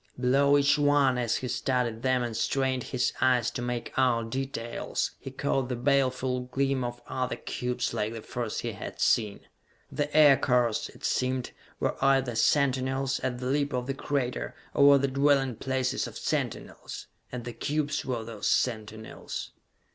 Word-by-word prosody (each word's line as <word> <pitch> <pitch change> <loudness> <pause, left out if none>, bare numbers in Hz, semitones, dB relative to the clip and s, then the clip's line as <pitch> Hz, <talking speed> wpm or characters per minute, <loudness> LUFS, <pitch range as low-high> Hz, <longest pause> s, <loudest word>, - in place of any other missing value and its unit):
Below 140 +3 +4
each 145 +1 +3
one, 145 -3 +3
as 120 -1 0
he 130 - -3
studied 120 -2 -1
them 130 -1 +2
and 120 -2 -4
strained 130 +2 0
his 125 -2 0
eyes 125 -3 +3
to 120 - -4
make 120 -1 -3
out 115 -3 +2
details, 130 -3 -3
he - - -7
caught 135 -1 -1
the 125 - -1
baleful 130 0 +1
gleam 135 +1 0
of 120 0 -4
other 130 0 -2
cubes 125 0 -3
like 105 +1 -1
the 115 -1 -7
first 120 -3 -3
he - - -3
had - - -8
seen. 105 -3 +2 0.5
The 145 0 -2
aircars, 125 -6 +4
it - - -8
seemed, 130 -1 0 0.3
were - - -2
either 135 -2 +3
sentinels, 130 +2 +1
at 125 -1 -2
the 125 - -6
lip 145 +2 0
of 125 -1 -1
the 135 - -2
crater, 125 - -2 0.2
or 140 - +5
were 140 0 +8
the 140 0 +1
dwelling 135 -2 +2
places 130 0 -1
of - - -9
sentinels - - -4 0.3
and 125 -2 -6
the 120 - -5
cubes 145 +4 -1
were 120 -3 -3
those 110 -2 -4
sentinels! 110 -2 -2
130 Hz, 165 wpm, -28 LUFS, 120-135 Hz, 0.5 s, were